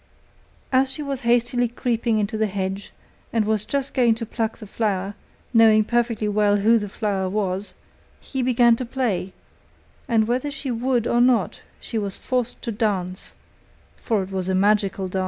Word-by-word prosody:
As 265 0 +3
she 300 - -5
was 275 -2 -3
hastily 245 +1 +2
creeping 235 -1 -1
into 210 +1 -1
the 220 0 +1
hedge 195 0 -4 0.4
and 225 -2 +1
was 215 -1 +1
just 275 +3 -2
going 240 -4 +3
to 230 0 -5
pluck 225 0 -3
the 220 - -10
flower, 200 -2 -2 0.4
knowing 220 -2 +6
perfectly 230 -1 0
well 205 0 +3
who 225 +3 +4
the 205 -1 -5
flower 195 -3 -1
was, 195 0 -2 0.4
he 265 - -4
began 240 -2 +4
to 255 - -3
play, 235 -7 -2 0.8
and 225 -4 +2
whether 250 +4 0
she 280 -2 -4
would 240 0 0
or 240 0 +2
not, 240 -8 +2 0.2
she 225 - -3
was 200 -2 -3
forced 250 -2 -2
to 235 - -2
dance, 195 -4 -2 0.6
for 215 -5 -1
it 190 - -9
was 190 -1 -2
a 190 - +1
magical 200 -1 +2
dance. 190 +1 -3
220 Hz, 175 wpm, -23 LUFS, 200-245 Hz, 0.8 s, knowing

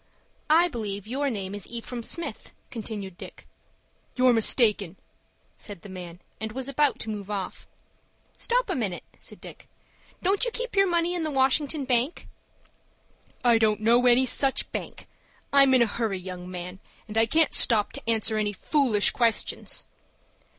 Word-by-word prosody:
"I 330 +3 +5
believe 205 - -5
your 275 +5 -2
name 200 -5 -5
is 205 -1 -6
Ephraim 235 +1 -6
Smith," 335 +8 -5 0.2
continued 205 -5 -7
Dick. - - -11 0.7
"You're 255 -1 +4
mistaken," 215 -5 +3 0.6
said 200 -5 -9
the 205 - -10
man, 180 -2 -9 0.2
and 220 0 -5
was 260 +1 -4
about 280 0 +1
to 220 - -5
move 205 -1 -7
off. 195 -3 -5 0.7
"Stop - - 0
a - - -1
minute," 200 -8 -3 0.2
said - - -9
Dick. - - -13 0.5
"Don't 390 +3 +1
you - - +1
keep 480 0 -4
your 390 0 +4
money 345 0 +1
in 350 - -2
the 315 - -2
Washington 275 +1 +1
Bank?" 255 +4 0 1.2
"I 235 -2 +5
don't 215 -2 +2
know 235 +3 +3
any 245 +2 +5
such 270 +2 +2
bank. - - -7 0.5
I'm 275 -1 +6
in 250 - +5
a - - +2
hurry, 220 -2 -2
young 180 -1 -8
man, 180 +1 -7 0.3
and 215 - -9
I 225 0 +4
can't 320 +4 +3
stop 215 -3 +5
to - - -7
answer 220 -1 +2
any 210 -1 -1
foolish 235 -2 +2
questions." 230 -3 -1
230 Hz, 160 wpm, -26 LUFS, 205-275 Hz, 1.2 s, I'm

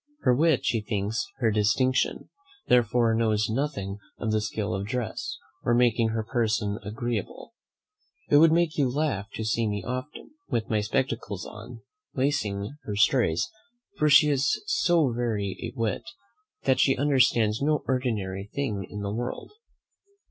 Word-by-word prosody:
Her 125 - +4
wit 155 +1 +2
she 115 - +1
thinks 105 - -2
her 115 -3 +2
distinction, 110 +5 +1 0.4
therefore 120 -1 +3
knows 110 -1 +1
nothing 105 -7 -2 0.2
of 110 - -2
the 110 0 +1
skill 105 -2 -3
of 95 +2 -3
dress, 120 -1 -3 0.3
or 120 - +2
making 120 -1 +3
her 110 0 -2
person 110 -3 -1
agreeable. 110 - -4 0.7
It - - +5
would 160 +1 +7
make 165 -2 +1
you 135 -3 +3
laugh 125 -7 -1
to 110 - -3
see 110 +1 +1
me 105 -2 -3
often, 130 - -6 0.2
with 115 -6 -2
my 105 -1 +2
spectacles 115 -4 -2
on, 115 +2 -10 0.3
lacing 125 -3 -1
her 105 - -3
stays, 100 -5 +3 0.5
for 150 - +4
she 150 +1 +7
is 145 +11 +1
so 175 - +2
very 110 -5 -2
a 120 +3 -6
wit, 110 -2 0 0.6
that 130 -1 +2
she 135 0 +4
understands 130 -6 +3
no 150 +1 +1
ordinary 105 -7 -2
thing 105 -9 -3
in 105 - -6
the 100 0 -3
world. 120 +3 -4
115 Hz, 150 wpm, -26 LUFS, 105-135 Hz, 0.7 s, would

